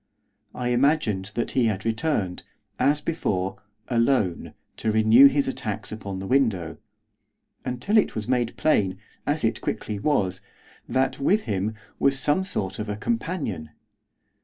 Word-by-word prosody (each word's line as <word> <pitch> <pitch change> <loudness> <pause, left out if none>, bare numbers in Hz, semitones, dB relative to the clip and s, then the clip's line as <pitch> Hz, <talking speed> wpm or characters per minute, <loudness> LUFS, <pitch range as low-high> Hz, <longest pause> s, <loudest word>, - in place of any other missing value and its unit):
I 125 -1 -2
imagined 120 -7 +1
that 120 - -1
he 125 -3 +2
had 100 -2 -2
returned, 110 - -1 0.4
as 145 +1 +3
before, 95 - -2 0.3
alone, 115 -6 +1 0.2
to 110 - 0
renew 110 +5 +7
his 140 0 +1
attacks 110 -5 -4
upon 100 -3 -5
the 95 - -5
window, 100 - +1 0.9
until 125 - 0
it - - 0
was 110 -2 -3
made 120 -2 0
plain, 100 -12 +2 0.3
as - - 0
it - - 0
quickly 105 -2 -3
was, 95 -9 0 0.5
that, 130 +1 +1
with 200 +10 +2
him, 105 +2 -2 0.2
was 135 0 +3
some 145 +7 +2
sort 100 - -3
of 105 0 -4
a 105 - -3
companion. 145 - -3
115 Hz, 140 wpm, -25 LUFS, 100-140 Hz, 0.9 s, renew